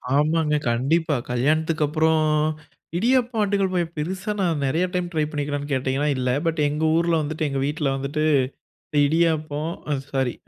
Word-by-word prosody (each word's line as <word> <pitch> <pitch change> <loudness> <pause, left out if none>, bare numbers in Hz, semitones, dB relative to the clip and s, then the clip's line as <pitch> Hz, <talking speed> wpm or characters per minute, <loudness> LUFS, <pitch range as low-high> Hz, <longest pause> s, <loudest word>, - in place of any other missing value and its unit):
ஆமாங்க. 150 +1 +2
கண்டிப்பா. 145 +6 +1 0.2
கல்யாணத்துக்கு 155 +5 +1
அப்புறம், 160 +1 +2 0.8
இடியப்பம் 245 +2 +2
ஆட்டுக்கல் 200 -2 +1
பாயா, 175 -2 +1
பெருசா 185 +7 -3
நான் 165 -5 0
நெறைய 160 +7 +1
டைம் 180 -1 -1
ட்ரை 155 -1 +1
பண்ணிக்கிறியான்னு 145 -1 -3
கேட்டிங்கன்னா, 135 +2 0
இல்லை. 125 -1 0
பட் 165 -1 0
எங்க 150 +2 -2
ஊர்ல 170 0 +1
வந்துட்டு 155 +1 -2
எங்க 135 -1 -2
வீட்ல 150 +1 -1
வந்துட்டு, 140 +3 -2 0.8
இடியப்பம் 155 0 0 0.2
அ - - +3 0.2
சாரி 130 -3 0
155 Hz, 145 wpm, -23 LUFS, 145-170 Hz, 0.8 s, அ